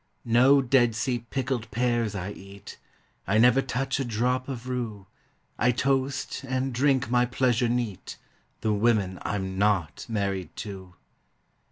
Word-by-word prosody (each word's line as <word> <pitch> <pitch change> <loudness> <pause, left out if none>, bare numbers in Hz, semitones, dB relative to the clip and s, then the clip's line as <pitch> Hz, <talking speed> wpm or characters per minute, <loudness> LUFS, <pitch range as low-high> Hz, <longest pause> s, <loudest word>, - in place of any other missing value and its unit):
No 130 +4 +5
Dead 120 -3 +3
Sea 120 +1 -1
pickled 125 0 -3
pears 120 -3 0
I 95 +1 -4
eat; 100 0 -12 0.5
I 100 +3 +2
never 125 +3 +5
touch 135 +2 -2
a - - 0
drop 125 +3 -1
of 125 -2 -6
rue; 115 -6 -4 0.5
I 125 - +3
toast, 135 +2 -1
and 130 0 -2
drink 130 0 +1
my 125 0 +3
pleasure 125 -1 +1
neat, 120 -5 -3 0.4
The 110 - +1
women 105 -4 +1
I'm 95 -1 -3
not 100 -7 0
married 100 -5 -2
to! 95 -3 -9
120 Hz, 140 wpm, -26 LUFS, 105-130 Hz, 0.5 s, No